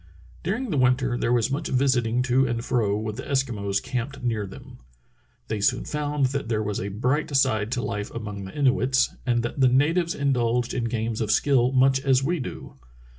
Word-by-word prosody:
* -, -, -24 dB
During 220 Hz, +6 st, -2 dB
the 150 Hz, -, +1 dB
winter 125 Hz, 0 st, +2 dB
there 120 Hz, -, 0 dB
was 120 Hz, +1 st, +2 dB
much 150 Hz, +3 st, -2 dB
visiting 125 Hz, -2 st, +1 dB
to 130 Hz, +1 st, +2 dB
and 120 Hz, 0 st, -3 dB
fro 105 Hz, -5 st, +1 dB
with 110 Hz, 0 st, -4 dB
the -, -, -5 dB
Eskimos 115 Hz, -8 st, -1 dB
camped 125 Hz, +2 st, -4 dB
near 110 Hz, -4 st, -1 dB
them. 95 Hz, -, -12 dB, 0.7 s
They 110 Hz, -2 st, -3 dB
soon 125 Hz, +5 st, +1 dB
found 150 Hz, -2 st, -1 dB
that 140 Hz, -5 st, -3 dB
there 110 Hz, -2 st, 0 dB
was 105 Hz, -1 st, -2 dB
a 100 Hz, -, -3 dB
bright 125 Hz, +9 st, -1 dB
side 110 Hz, -5 st, +2 dB
to 120 Hz, -, -2 dB
life 105 Hz, 0 st, -3 dB
among 105 Hz, -4 st, -6 dB
the 95 Hz, -, -10 dB
Inuits, 135 Hz, -1 st, +2 dB
and 120 Hz, -1 st, +2 dB
that 120 Hz, -, -4 dB
the 130 Hz, -1 st, +5 dB
natives 165 Hz, +7 st, +2 dB
indulged 125 Hz, -3 st, 0 dB
in 120 Hz, -, -1 dB
games 115 Hz, -1 st, -2 dB
of 110 Hz, -, -1 dB
skill 130 Hz, +1 st, +3 dB
much 135 Hz, 0 st, +4 dB
as 135 Hz, -1 st, +2 dB
we 170 Hz, +4 st, 0 dB
do. 125 Hz, -, -7 dB
125 Hz, 200 wpm, -25 LUFS, 115-135 Hz, 0.7 s, the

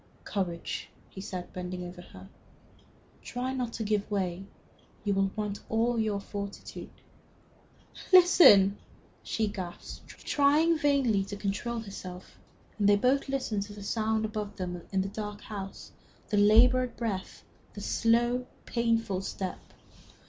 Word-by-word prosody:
"Courage!" 175 Hz, -5 st, -3 dB, 0.2 s
he 190 Hz, -, -8 dB
said, 185 Hz, -2 st, -6 dB
bending 180 Hz, 0 st, -5 dB
over 175 Hz, 0 st, -8 dB
her. 95 Hz, -, -13 dB, 0.9 s
"Try 250 Hz, +1 st, -3 dB
not 250 Hz, -3 st, -2 dB
to 225 Hz, -, -3 dB
give 210 Hz, -1 st, 0 dB
way. 190 Hz, -2 st, -2 dB, 0.6 s
You 205 Hz, -1 st, +1 dB
will 195 Hz, 0 st, +2 dB
want 210 Hz, -2 st, -3 dB
all 230 Hz, +1 st, +1 dB
your 215 Hz, -2 st, 0 dB
fortitude." 200 Hz, 0 st, -7 dB, 1.2 s
"Listen!" 325 Hz, -, +8 dB, 0.4 s
She 220 Hz, -, -1 dB
gasped, 190 Hz, -4 st, -7 dB
trying 300 Hz, +4 st, +2 dB
vainly 275 Hz, -9 st, +2 dB
to 205 Hz, -, -6 dB
control 205 Hz, +4 st, -2 dB
herself, 185 Hz, -3 st, -9 dB, 0.4 s
and 205 Hz, -1 st, +4 dB
they 205 Hz, -, +7 dB
both 260 Hz, +6 st, +2 dB
listened 260 Hz, -7 st, -1 dB
to 205 Hz, -, -10 dB
the 205 Hz, -1 st, -9 dB
sounds 220 Hz, +1 st, 0 dB
above 210 Hz, -1 st, -4 dB
them 180 Hz, -2 st, -4 dB
in 190 Hz, -1 st, +2 dB
the -, -, -3 dB
dark 210 Hz, 0 st, -5 dB
house 195 Hz, -2 st, -7 dB, 0.4 s
the 205 Hz, -, +1 dB
labored 240 Hz, +4 st, +5 dB
breath, 205 Hz, -6 st, -4 dB, 0.3 s
the -, -, -6 dB
slow, 240 Hz, +2 st, +2 dB, 0.2 s
painful 230 Hz, -5 st, 0 dB
step. 190 Hz, -1 st, -4 dB
210 Hz, 135 wpm, -29 LUFS, 195-235 Hz, 1.2 s, Listen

